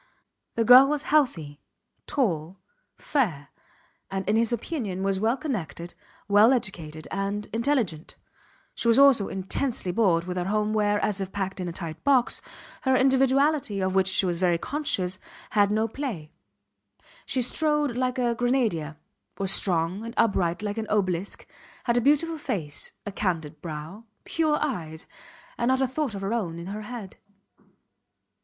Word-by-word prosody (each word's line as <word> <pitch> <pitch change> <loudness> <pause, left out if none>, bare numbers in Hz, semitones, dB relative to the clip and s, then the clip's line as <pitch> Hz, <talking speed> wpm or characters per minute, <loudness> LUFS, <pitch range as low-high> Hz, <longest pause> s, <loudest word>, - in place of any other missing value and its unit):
The 230 - +2
girl 255 +4 +9
was 295 0 -1
healthy, 160 - +1 0.5
tall, 180 - -1 0.4
fair, 170 - -1 0.6
and 195 0 -4
in 210 - +2
his 230 +1 +2
opinion 225 - -3
was 195 -1 0
well 225 +5 +1
connected, 185 - -5 0.3
well 210 +5 +6
educated 165 - -4
and 200 +1 -2
intelligent. 230 - -1 0.6
She - - -2
was 230 - +5
also 275 -7 +6
intensely 195 +2 -2
bored 175 -5 +2
with 180 +1 -5
her 175 - -1
home 210 +2 0
where, 205 -1 +2
as 205 -2 0
if 190 0 -4
packed 190 -1 -3
in 180 - -3
a - - -3
tight 165 -2 -7
box, 265 -3 +3 0.4
her 265 -1 +2
individuality 265 -2 +2
of 190 0 0
which 190 -1 +3
she 190 0 +2
was 175 -2 -1
very 175 -2 +2
conscious 190 - -1 0.3
had 205 -2 +3
no 215 +2 +1
play. 220 - -5 1.0
She 255 - +1
strode 300 0 +1
like 255 0 -1
a 240 -2 +1
grenadier, 230 - 0 0.4
was 195 -1 +2
strong 180 +1 +1
and 230 +1 -7
upright 190 -5 +1
like 205 +1 -2
an 220 - -4
obelisk, 185 -2 -1 0.4
had 235 - +1
a 245 - +3
beautiful 300 +5 +2
face, 160 - -3
a 205 - -4
candid 160 -7 -3
brow, 165 +7 -7 0.2
pure 310 -2 +1
eyes, 165 - -4 0.5
and 235 - +1
not 260 0 +3
a 265 - +3
thought 260 -3 -2
of 195 - -5
her 195 +3 -2
own 180 -8 -2
in 170 - -7
her 205 +3 -5
head. 215 -3 -8
210 Hz, 160 wpm, -26 LUFS, 180-250 Hz, 1.0 s, girl